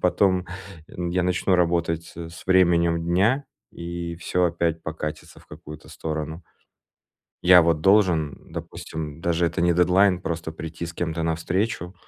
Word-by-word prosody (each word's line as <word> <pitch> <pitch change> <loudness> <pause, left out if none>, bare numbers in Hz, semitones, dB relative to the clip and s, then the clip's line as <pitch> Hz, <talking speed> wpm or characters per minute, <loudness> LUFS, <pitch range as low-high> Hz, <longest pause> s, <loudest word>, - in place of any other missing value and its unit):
потом 90 +1 +2 0.4
н 85 +1 -5
я 90 +1 0
начну 90 +1 +1
работать, 85 -2 0
э, 85 -1 -7
с 85 - -12
временем 85 -3 +3
дня, 100 +11 +2 0.3
и 85 0 -6
всё 90 +1 0
опять 85 -1 0
покатится 75 -1 -6
в - - -22
какую-то 75 0 -11
сторону. 80 +1 -5 1.0
Я 90 0 +8
вот 80 -2 +1
должен, 90 -7 +2
допустим- 75 -1 -7
даже 85 0 0
это 85 0 -1
не 85 0 +3
дедлайн- 90 +1 +3
просто 80 -2 -4
прийти 80 +1 -6
с 85 - -9
кем-то 80 -1 -3
на 80 0 +1
встречу. 90 +1 -2
85 Hz, 150 wpm, -24 LUFS, 80-90 Hz, 1.0 s, Я